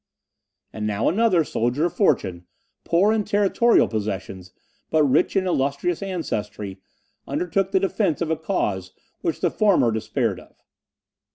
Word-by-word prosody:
And 105 -1 -3
now 105 +1 0
another 195 -4 +3
soldier 125 +3 0
of 175 - -2
fortune, 90 - 0 0.4
poor 195 +6 +3
in 220 -1 +1
territorial 205 +3 +3
possessions, 95 -4 -5 0.4
but 155 -1 +3
rich 140 +6 +2
in 190 -1 +2
illustrious 155 +2 0
ancestry, 105 - -4 0.5
undertook 185 +2 -1
the 190 - +3
defence 195 -3 0
of 165 -2 -1
a - - +2
cause 105 - -2 0.3
which - - -2
the - - +1
former 195 - +3
despaired 110 0 -1
of. - - -18
160 Hz, 140 wpm, -23 LUFS, -, 0.5 s, another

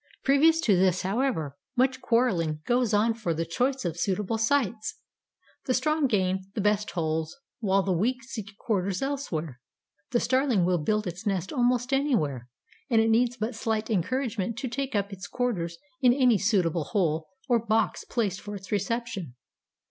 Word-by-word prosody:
Previous 310 +4 +5
to 210 -9 +4
this, 185 0 +2
however, 190 - -1 0.2
much 260 +1 +2
quarreling 175 -11 +1
goes 245 -2 +2
on 220 +2 +3
for 210 -8 -2
the 165 +1 -1
choice 255 +8 -1
of 170 -1 -2
suitable 205 +4 -1
sites. 225 -3 0 0.7
The 255 - +2
strong 305 +2 +2
gain 190 -4 +1 0.2
the - - -2
best 210 0 +1
holes, 160 - -2 0.2
while 195 -3 +2
the 190 - -1
weak 245 +9 0
seek 215 -5 -8
quarters 195 -1 -1
elsewhere. 165 - -3 0.5
The 240 - +2
Starling 255 -8 +2
will 180 -1 +2
build 210 +7 0
its 180 +4 -5
nest 190 - -1
almost 245 0 +1
anywhere, 155 - 0 0.4
and 230 -3 +4
it 225 0 +3
needs 240 +2 +2
but 225 +2 -2
slight 220 0 -2
encouragement 225 +1 -1
to 255 - -3
take 265 +1 -3
up 200 0 -1
its 195 +1 -7
quarters 180 -10 -2 0.2
in 250 -2 +6
any 250 -6 +4
suitable 180 -7 +1
hole 160 -5 0 0.2
or 240 -2 +3
box 220 -3 +1
placed 205 -5 -2
for 205 0 -6
its 195 +1 -10
reception. 205 - -2
215 Hz, 165 wpm, -27 LUFS, 185-245 Hz, 0.7 s, in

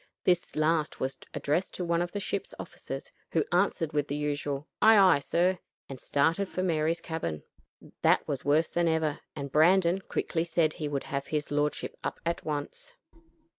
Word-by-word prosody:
This 175 -2 +1
last 155 0 +1
was 130 +1 -2 0.2
addressed 160 +6 -1
to 180 - -3
one 170 0 +1
of 175 0 -2
the 205 - -3
ship's 200 - -3
officers, - - -7 0.2
who - - +2
answered 165 -3 +1
with 145 -1 0
the 145 - -2
usual 145 -1 -2 0.2
"Aye, 220 0 +8
aye, 185 -7 +6
sir," 175 +6 +1 0.3
and 135 -2 -8
started 165 +10 +1
for 185 - -2
Mary's 165 -1 +1
cabin. 120 - -4 0.6
That - - +3
was 140 - -3
worse 150 +4 +3
than 170 0 +1
ever; 160 -2 +1 0.2
and 140 -1 -5
Brandon 175 +4 +4
quickly 165 -3 -1
said 165 -2 +1
he 155 - -4
would 140 -2 -2
have 140 0 -4
his 150 -1 -2
lordship 145 0 -1
up - - -3
at 170 0 -1
once. 150 - -5
160 Hz, 175 wpm, -29 LUFS, 145-175 Hz, 0.6 s, Aye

